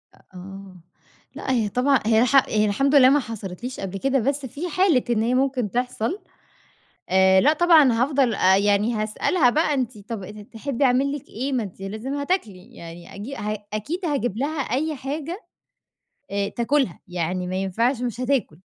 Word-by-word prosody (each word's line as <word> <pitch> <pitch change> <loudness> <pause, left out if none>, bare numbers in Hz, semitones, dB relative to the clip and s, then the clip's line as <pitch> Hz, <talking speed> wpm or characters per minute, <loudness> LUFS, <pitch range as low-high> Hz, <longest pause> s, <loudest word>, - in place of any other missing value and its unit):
أ - - -24
آه، 195 +1 -10 0.6
لأ - - -3
هي 225 -5 +1
طبعًا 255 +5 +2
هي 220 0 +4
الح 255 +3 +2
هي 215 0 +2
الحمد 275 +8 +1
لله 260 -2 +8
ما 290 +2 +4
حصلِتليش 225 +1 -7
قبل 195 0 -5
كده، 270 +3 +1
بس 275 +3 -1
في 295 +8 -5
حالة 340 -6 +2
إن 225 -2 +1
هي 240 +2 +1
ممكن 260 -5 0
تِحصل، 250 - -2 0.9
آآ 190 0 +5
لأ 295 - +4
طبعًا 315 -5 +5
هافضل 255 0 +1
آآ 190 -1 +4
يعني 205 +3 +2
هاسألها 220 +7 +1
بقى، 305 +2 +1
أنتِ 250 -4 -2
طَب 210 +1 -7
ات 210 +3 -10 0.2
تحبّي 275 +3 -2
أعمل 265 +2 +2
لِك 290 -2 -7
إيه؟ 265 +5 -4
ما 250 -3 0
أنتِ 195 -2 -9
لازم 215 +8 -5
هتاكلي، 285 - -3
يعني 170 +1 -11
أجي 225 +8 -7
ه 210 0 -4
أكيد 300 - -4
هاجيب 245 - -1
لها 285 +5 -2
أي 285 +5 -1
حاجة 305 - -5 0.9
آآ 200 0 -1
تأكلها، 240 - 0
يعني 180 +1 -2
ما 185 +1 -3
ينفعش 225 +7 0
مش 245 -1 -3
هتاكل، 255 - -1
245 Hz, 175 wpm, -23 LUFS, 205-275 Hz, 0.9 s, لله